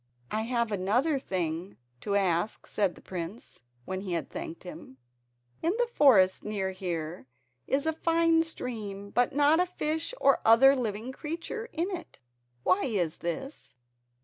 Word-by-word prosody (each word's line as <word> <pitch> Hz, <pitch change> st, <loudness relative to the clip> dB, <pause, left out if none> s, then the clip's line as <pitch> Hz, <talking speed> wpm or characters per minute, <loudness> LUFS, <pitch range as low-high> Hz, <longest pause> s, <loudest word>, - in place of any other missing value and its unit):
"I 215 Hz, -, 0 dB
have 235 Hz, -3 st, 0 dB
another 235 Hz, -, +1 dB
thing 180 Hz, -3 st, -3 dB, 0.2 s
to 200 Hz, +7 st, -2 dB
ask," 190 Hz, 0 st, +1 dB
said 200 Hz, -4 st, 0 dB
the -, -, -16 dB
prince, 185 Hz, +5 st, -7 dB, 0.2 s
when 190 Hz, 0 st, -3 dB
he 190 Hz, -3 st, -4 dB
had 165 Hz, -4 st, -3 dB
thanked 165 Hz, -, -6 dB
him. 155 Hz, -7 st, -10 dB, 0.6 s
"In 335 Hz, +3 st, +1 dB
the 485 Hz, -, +3 dB
forest 250 Hz, -, +5 dB
near 200 Hz, -3 st, -2 dB
here 170 Hz, -5 st, -4 dB, 0.4 s
is 275 Hz, +2 st, +1 dB
a 320 Hz, -, +1 dB
fine 330 Hz, 0 st, +3 dB
stream 210 Hz, -10 st, -5 dB
but 245 Hz, +2 st, +1 dB
not 295 Hz, +3 st, +5 dB
a 360 Hz, -, +3 dB
fish 320 Hz, +5 st, -2 dB
or 275 Hz, -, +4 dB
other 265 Hz, +5 st, +7 dB
living 230 Hz, -1 st, -3 dB
creature 335 Hz, -, -5 dB
in 345 Hz, +5 st, -2 dB
it. 350 Hz, -3 st, -7 dB, 0.5 s
Why 185 Hz, -, +3 dB
is 180 Hz, -10 st, -1 dB
this?" 220 Hz, -, -5 dB
220 Hz, 150 wpm, -29 LUFS, 185-300 Hz, 0.6 s, other